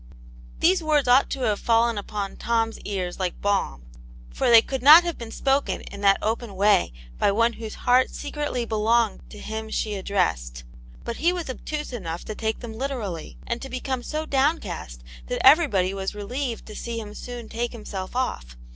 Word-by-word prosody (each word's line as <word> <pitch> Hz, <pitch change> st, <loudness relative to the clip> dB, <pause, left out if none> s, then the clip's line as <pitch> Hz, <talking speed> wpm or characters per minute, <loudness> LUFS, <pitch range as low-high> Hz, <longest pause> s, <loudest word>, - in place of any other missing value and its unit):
These 360 Hz, +1 st, +4 dB
words 300 Hz, -4 st, +2 dB
ought 250 Hz, +3 st, +5 dB
to 270 Hz, -, -4 dB
have 210 Hz, -4 st, +1 dB
fallen 230 Hz, 0 st, +2 dB
upon 205 Hz, -1 st, -4 dB
Tom*s 225 Hz, -1 st, -1 dB
ears 185 Hz, -3 st, -3 dB
like 185 Hz, -2 st, -2 dB
balm, 195 Hz, -, -1 dB, 0.5 s
for -, -, +1 dB
they 230 Hz, -1 st, +8 dB
could 265 Hz, -2 st, -4 dB
not 305 Hz, +6 st, +10 dB
have 345 Hz, -1 st, -2 dB
been 230 Hz, -1 st, -8 dB
spoken 275 Hz, +4 st, 0 dB
in 200 Hz, -, -8 dB
that 195 Hz, -1 st, +5 dB
open 220 Hz, -1 st, -2 dB
way 200 Hz, -, +3 dB, 0.3 s
by -, -, +3 dB
one 230 Hz, +3 st, +2 dB
whose 225 Hz, -2 st, -7 dB
heart 250 Hz, +1 st, +4 dB
secretly 290 Hz, -4 st, -3 dB
belonged 225 Hz, 0 st, +1 dB
to -, -, -11 dB
him 220 Hz, +1 st, -6 dB
she 215 Hz, -1 st, -2 dB
addressed. 70 Hz, -, -1 dB, 0.4 s
But 235 Hz, -, -5 dB
he 340 Hz, +3 st, +3 dB
was 350 Hz, -6 st, -3 dB
obtuse 300 Hz, +1 st, -5 dB
enough 175 Hz, -7 st, -5 dB
to 215 Hz, -, -5 dB
take 220 Hz, +1 st, -3 dB
them 235 Hz, -2 st, -7 dB
literally, 220 Hz, -, -5 dB
and 235 Hz, 0 st, -3 dB
to 270 Hz, -, -7 dB
become 255 Hz, 0 st, -3 dB
so 310 Hz, +5 st, -4 dB
downcast 240 Hz, -, -1 dB, 0.2 s
that -, -, -2 dB
everybody 260 Hz, -, +5 dB
was 195 Hz, +1 st, -4 dB
relieved 240 Hz, +4 st, -4 dB
to 215 Hz, -, -10 dB
see 235 Hz, +1 st, -4 dB
him 210 Hz, -2 st, -8 dB
soon 240 Hz, 0 st, -8 dB
take 235 Hz, +2 st, -3 dB
himself, 210 Hz, -3 st, -7 dB
off. 60 Hz, -, -3 dB
230 Hz, 180 wpm, -24 LUFS, 200-260 Hz, 0.5 s, not